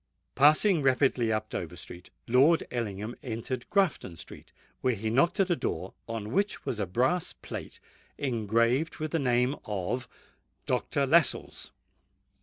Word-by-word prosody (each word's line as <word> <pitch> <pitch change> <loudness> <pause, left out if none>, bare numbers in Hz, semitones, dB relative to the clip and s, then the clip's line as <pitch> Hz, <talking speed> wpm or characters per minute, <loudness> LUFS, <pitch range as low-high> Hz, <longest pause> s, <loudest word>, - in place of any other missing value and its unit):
Passing 155 +5 +5
rapidly 130 -3 +2
up 110 0 -2
Dover 85 0 -4
Street, 90 +1 -10 0.2
Lord 135 +8 +4
Ellingham 110 -2 -3
entered 120 +1 -5
Grafton 185 - +1
Street, - - -12 0.3
where 125 -2 +1
he 110 +1 -3
knocked 155 - +2
at 190 -2 +3
a - - +4
door - - -3
on 115 -2 -5
which 205 +8 -1
was 110 - -2
a 100 - -1
brass 130 - +1
plate - - -8 0.4
engraved 115 +3 +1
with 155 -2 -4
the 165 - +1
name 125 0 +2
of 105 +5 -3 0.6
DR. 140 - 0
LASCELLES. 160 +2 +2
125 Hz, 140 wpm, -29 LUFS, 110-150 Hz, 0.6 s, Passing